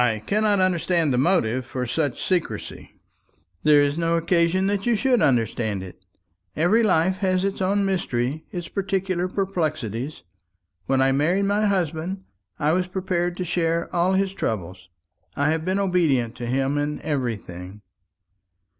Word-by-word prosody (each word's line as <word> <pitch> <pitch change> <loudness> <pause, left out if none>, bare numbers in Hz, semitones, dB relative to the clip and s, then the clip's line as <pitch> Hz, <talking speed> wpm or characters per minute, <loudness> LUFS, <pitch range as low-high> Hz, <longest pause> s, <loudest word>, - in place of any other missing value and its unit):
"I 115 -3 +2
cannot 210 -1 +2
understand 170 -4 +2
the 125 - +2
motive 130 -7 +2
for 125 0 -4
such 140 +1 -1
secrecy." 180 -3 -3 0.7
"There 145 +2 +5
is 145 +3 0
no 165 0 +1
occasion 170 +2 +2
that 200 +2 -1
you 240 - +3
should 250 +2 +2
understand 115 -5 +1
it. 90 0 -12 0.5
Every 175 +9 +3
life 185 -3 +2
has 185 -1 +1
its 195 0 -2
own 200 +2 +1
mystery 155 -6 -1
its 175 -1 -5
peculiar 190 -2 -1
perplexities. 155 - -3 0.6
When 130 0 +3
I 135 - +3
married 170 +9 +2
my 205 +1 +2
husband, 185 0 -1 0.3
I 150 +1 +1
was 180 +1 +1
prepared 180 -2 -2
to 180 - -3
share 170 -1 -1
all 175 +2 +2
his 195 0 +1
troubles. 95 - -4 0.5
I 145 +2 +2
have 160 0 -1
been 185 +3 0
obedient 165 - +1
to 120 -1 -5
him 135 +3 0
in 150 +1 -2
everything." 105 - -4
170 Hz, 150 wpm, -23 LUFS, 135-190 Hz, 0.7 s, There